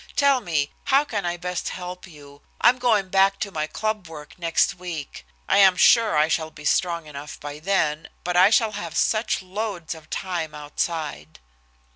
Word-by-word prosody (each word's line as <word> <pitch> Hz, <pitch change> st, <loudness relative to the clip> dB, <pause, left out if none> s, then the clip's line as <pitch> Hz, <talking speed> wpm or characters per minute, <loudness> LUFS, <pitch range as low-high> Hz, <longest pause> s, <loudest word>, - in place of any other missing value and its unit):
Tell 280 Hz, -2 st, +3 dB
me, 155 Hz, -7 st, -1 dB
how 280 Hz, +1 st, +4 dB
can 205 Hz, -9 st, -3 dB
I 175 Hz, 0 st, -2 dB
best 180 Hz, +1 st, -3 dB
help 180 Hz, 0 st, -7 dB
you? 145 Hz, -3 st, -15 dB, 0.2 s
I'm 250 Hz, +1 st, +4 dB
going 215 Hz, -6 st, +2 dB
back 195 Hz, +1 st, +3 dB
to 200 Hz, -, -2 dB
my 155 Hz, -3 st, -2 dB
club 215 Hz, 0 st, -3 dB
work 155 Hz, +1 st, -11 dB
next 170 Hz, -1 st, +2 dB
week 160 Hz, -, -7 dB, 0.2 s
I -, -, +4 dB
am 190 Hz, -2 st, +6 dB
sure 225 Hz, -8 st, +5 dB
I 150 Hz, +1 st, +4 dB
shall 160 Hz, 0 st, -1 dB
be 150 Hz, -1 st, -13 dB
strong 170 Hz, 0 st, +1 dB
enough 150 Hz, 0 st, -9 dB
by 145 Hz, 0 st, -7 dB
then, 160 Hz, -3 st, 0 dB
but 180 Hz, 0 st, -2 dB
I 185 Hz, +2 st, +7 dB
shall 225 Hz, 0 st, +3 dB
have 170 Hz, -5 st, -5 dB
such 215 Hz, -3 st, +1 dB
loads 190 Hz, -3 st, -4 dB
of 160 Hz, -1 st, -14 dB
time 170 Hz, -5 st, -3 dB
outside." 150 Hz, -, -4 dB
175 Hz, 180 wpm, -24 LUFS, 155-200 Hz, 0.2 s, I